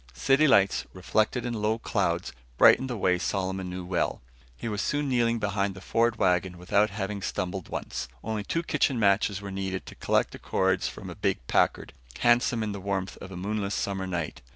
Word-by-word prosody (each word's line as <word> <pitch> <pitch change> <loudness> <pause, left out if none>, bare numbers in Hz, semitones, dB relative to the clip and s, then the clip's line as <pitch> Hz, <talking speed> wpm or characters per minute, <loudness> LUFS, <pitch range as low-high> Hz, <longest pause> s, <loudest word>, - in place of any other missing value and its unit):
City 135 - +4
lights, 100 -7 +4
reflected 110 +6 0
in 120 - -2
low 110 0 0
clouds, 90 -6 -1 0.2
brightened 130 - +6
the 120 - -3
way 90 -2 +2
Solomon 95 0 -2
knew 90 0 -5
well. 90 -1 -1 0.4
He - - -5
was 105 -2 -2
soon 145 0 0
kneeling 120 -3 +2
behind 100 -2 -1
the - - -9
Ford 115 +4 +1
wagon 90 -3 +1
without 100 +4 +2
having 100 0 -4
stumbled 95 -1 -3
once. - - -4 0.2
Only 110 -1 -2
two 165 +10 -1
kitchen 135 -6 +1
matches 100 -1 +2
were 100 - -5
needed 95 -1 -3
to - - -10
collect - - +1
the - - -10
cords 95 -1 +1
from - - -7
a - - -8
big - - -1
Packard, - - +1 0.2
handsome 120 -1 +3
in 105 - -2
the 100 -1 -6
warmth 95 -1 -2
of - - -9
a 90 - -7
moonless 100 +1 -2
summer 95 -1 -2
night. 85 -6 -3
100 Hz, 195 wpm, -27 LUFS, 95-110 Hz, 0.4 s, brightened